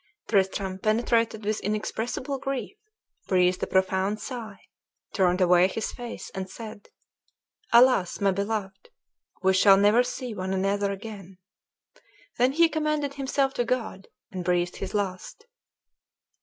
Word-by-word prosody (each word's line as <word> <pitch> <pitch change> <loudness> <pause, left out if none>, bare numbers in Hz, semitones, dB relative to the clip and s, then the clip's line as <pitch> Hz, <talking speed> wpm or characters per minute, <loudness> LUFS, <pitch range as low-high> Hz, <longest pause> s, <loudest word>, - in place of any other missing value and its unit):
Tristram, 190 -1 0
penetrated 225 0 +1
with 215 0 0
inexpressible 225 +6 -3
grief, 275 +6 -4 0.5
breathed 180 -1 +2
a - - -1
profound 190 +2 +1
sigh, 225 -6 -7 0.6
turned 185 -2 +2
away 180 0 +5
his 220 +3 -4
face, 240 -1 -8
and 190 0 -5
said, 215 0 -10 0.8
"Alas, 235 -6 +5
my 200 -1 +3
beloved! 200 - -4 0.5
we 190 0 +4
shall 195 +1 +6
never 205 +4 +5
see 250 -1 -4
one 190 -1 -3
another 200 +1 0
again!" 195 -2 -9 1.0
Then 250 +2 +3
he 335 +3 +5
commended 305 -2 -1
himself 270 0 0
to 245 - 0
God, 230 -5 -3 0.2
and 185 -3 -5
breathed 175 0 0
his 195 - -5
last. 200 - -4
210 Hz, 130 wpm, -26 LUFS, 190-245 Hz, 1.0 s, shall